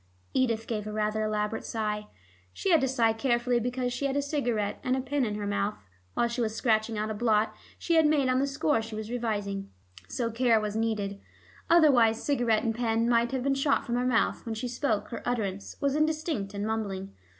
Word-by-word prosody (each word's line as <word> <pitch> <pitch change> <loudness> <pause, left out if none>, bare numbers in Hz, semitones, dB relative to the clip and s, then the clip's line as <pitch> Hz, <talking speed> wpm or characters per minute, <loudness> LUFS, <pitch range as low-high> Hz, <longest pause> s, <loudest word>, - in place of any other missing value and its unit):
Edith 230 -4 +1
gave 215 -2 -3
a - - -4
rather 215 0 0
elaborate 215 0 -1
sigh. 210 -1 -3 0.5
She 390 - -1
had 325 -4 +5
to 265 - +2
sigh 235 -4 +2
carefully 240 0 +1
because 245 +1 -2
she 275 +3 -1
had 270 - -2
a - - +2
cigarette 240 -8 -1
and 255 0 +1
a - - 0
pen 270 +2 -1
in 210 -3 -1
her 210 -1 -3
mouth, 205 +1 -1 0.4
while 235 - +2
she 235 +1 -3
was 220 -1 -1
scratching 220 -2 +1
out 215 +1 -1
a - - -1
blot 215 0 +2 0.2
she 340 - -1
had 320 -2 +5
made 295 -3 +3
on 255 0 +2
the 275 - +1
score 280 -2 +1
she 220 0 -7
was 215 +1 -5
revising. 205 -5 -2 0.4
So 230 -2 -2
care 230 -1 +3
was 210 -1 -3
needed; 210 -3 -1 0.5
otherwise 260 -10 +5
cigarette 240 -6 +2
and 225 - 0
pen 230 0 +1
might 235 0 +3
have 260 -2 -1
been 275 0 +2
shot 275 +1 +1
from 235 - -3
her 245 +1 +1
mouth. 235 -3 +1
When 225 -1 -4
she 230 +3 -3
spoke 240 -3 -1
her 230 - -5
utterance 205 -5 -3
was 280 -1 +1
indistinct 305 - -1
and 200 +1 -2
mumbling. 200 -3 -3
230 Hz, 215 wpm, -28 LUFS, 215-255 Hz, 0.5 s, had